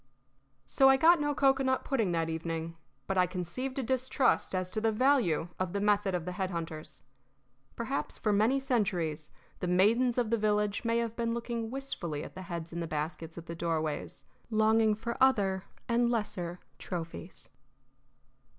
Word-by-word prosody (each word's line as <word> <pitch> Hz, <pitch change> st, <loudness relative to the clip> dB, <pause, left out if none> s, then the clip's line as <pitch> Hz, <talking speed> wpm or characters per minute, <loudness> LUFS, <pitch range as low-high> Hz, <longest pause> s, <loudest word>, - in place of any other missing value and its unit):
So 270 Hz, -, +5 dB
I 270 Hz, -, +6 dB
got 330 Hz, +3 st, +6 dB
no 290 Hz, 0 st, 0 dB
cocoanut 270 Hz, -1 st, +2 dB
pudding 225 Hz, -9 st, 0 dB
that 165 Hz, -1 st, 0 dB
evening, 165 Hz, 0 st, -4 dB, 0.3 s
but 195 Hz, -1 st, 0 dB
I 180 Hz, -, +4 dB
conceived 185 Hz, +10 st, -4 dB
a 270 Hz, -, 0 dB
distrust 260 Hz, -3 st, +1 dB
as 185 Hz, 0 st, -2 dB
to 215 Hz, -, -2 dB
the 225 Hz, 0 st, +2 dB
value 215 Hz, -, +2 dB
of 185 Hz, -2 st, -2 dB
the 200 Hz, -, 0 dB
method 205 Hz, -2 st, +2 dB
of 170 Hz, -2 st, -3 dB
the 180 Hz, -, -3 dB
head 185 Hz, +1 st, -2 dB
hunters. 165 Hz, -3 st, -6 dB, 0.7 s
Perhaps -, -, -3 dB
for 210 Hz, -, +1 dB
many 220 Hz, +7 st, +3 dB
centuries 175 Hz, -, -1 dB, 0.3 s
the 180 Hz, -, -2 dB
maidens 225 Hz, +8 st, +3 dB
of 235 Hz, -3 st, +1 dB
the 230 Hz, -, +2 dB
villages 210 Hz, -1 st, +1 dB
may 230 Hz, 0 st, +1 dB
have 230 Hz, -1 st, -1 dB
been 230 Hz, -1 st, -1 dB
looking 235 Hz, -1 st, -3 dB
wistfully 185 Hz, -, -4 dB
at -, -, -9 dB
the 185 Hz, -, -8 dB
heads 170 Hz, -2 st, -6 dB
in 170 Hz, -, -3 dB
the 165 Hz, -, -3 dB
baskets 160 Hz, +2 st, -4 dB
at 165 Hz, -, -8 dB
the 170 Hz, -, -6 dB
doorways, 160 Hz, -2 st, -3 dB, 0.2 s
longing 220 Hz, 0 st, +3 dB
for 230 Hz, +2 st, -4 dB
other 195 Hz, -7 st, +3 dB, 0.2 s
and 235 Hz, 0 st, +2 dB
lesser 180 Hz, -6 st, -2 dB, 0.2 s
trophies. 165 Hz, -, -6 dB
205 Hz, 170 wpm, -31 LUFS, 170-235 Hz, 0.7 s, I